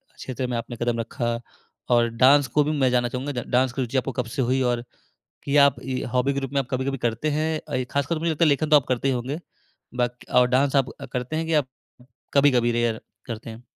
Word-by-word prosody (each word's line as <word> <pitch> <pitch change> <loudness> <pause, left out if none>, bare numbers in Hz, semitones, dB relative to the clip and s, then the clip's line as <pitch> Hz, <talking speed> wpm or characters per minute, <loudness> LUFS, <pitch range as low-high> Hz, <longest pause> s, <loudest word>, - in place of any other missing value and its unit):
क्षेत्र 130 0 -4
में 120 -1 -2
आपने 120 +1 -5
कदम 120 -1 0
रखा 115 0 -2 0.5
और 120 -1 +4
डांस 140 +1 +6
को 150 - +6
भी 150 - -1
मैं 130 - +5
जानना 120 -1 +2
चाहूँगा 130 +4 -4
डा 125 - -3
डांस 130 -1 +3
की 135 - -2
रुचि 125 +2 -2
आपको 130 +1 0
कब - - -8
से 135 - -1
हुई? 130 +2 +1
और 120 -1 0 0.6
कि 140 +1 0
आप 140 -1 +6
ये 130 -1 -3
हॉबी 130 +2 +2
के 140 - -1
रूप 135 0 -5
में 140 - +1
आप 125 - -5
कभी-कभी 135 +1 -1
करते 120 +6 -1
हैं 155 +1 -1
अ, - - -4
ये 130 - 0
खासकर 140 +3 0
मुझे 165 +1 0
लगता 160 +2 +2
है - - +4
लेखन 150 +2 +1
तो 150 - +8
आप 140 - +3
करते 130 +1 0
ही 130 - +2
होंगे। 130 +7 -3 0.6
बाकी 120 0 -2
और 125 0 +5
डांस 135 +2 +2
आप 135 -2 +2 0.2
करते 125 +5 -3
हैं 160 0 -1
कि 165 - -2
आप 145 -4 +2 0.7
कभी-कभी 125 -4 +4
रेयर 115 -1 0 0.3
करते 115 -1 -6
हैं? 115 +2 -11
130 Hz, 245 wpm, -24 LUFS, 120-140 Hz, 0.7 s, तो